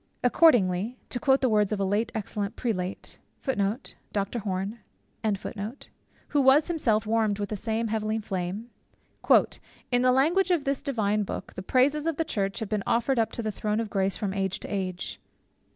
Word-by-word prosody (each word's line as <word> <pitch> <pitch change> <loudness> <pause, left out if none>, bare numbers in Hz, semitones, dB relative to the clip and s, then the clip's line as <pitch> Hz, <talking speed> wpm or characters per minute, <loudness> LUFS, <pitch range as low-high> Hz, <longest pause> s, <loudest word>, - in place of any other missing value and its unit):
Accordingly 240 - +4
(to 245 - -2
quote 270 -1 +3
the 260 - +3
words 210 -2 +2
of 210 - -1
a - - +1
late 210 +4 0
excellent 205 -1 -3
prelate, 190 -6 -3 0.3
who 210 -5 +1 2.6
was 270 +3 +5
himself 230 -11 +1
warmed 215 -2 +1
with 205 -1 -3
the 215 - -2
same 225 +2 -1
heavenly 215 0 -1
flame) 195 +2 -4 1.2
"in 245 0 +3
the 255 0 +5
language 330 +9 +3
of 345 -5 +2
this 275 -1 0
divine 215 -6 0
book, 200 - -5
the - - -6
praises 275 +9 +2
of 325 -3 0
the 325 - 0
church 195 -9 -1
have 220 - -3
been 215 -2 0
offered 240 +2 +2
up 225 - +1
to 235 - -3
the 215 - -1
Throne 210 +1 -1
of 225 -2 -3
Grace 195 -1 +1
from 200 -3 -2
age 195 -1 -1
to - - -6
age." 185 -2 -3
220 Hz, 170 wpm, -27 LUFS, 200-255 Hz, 2.6 s, was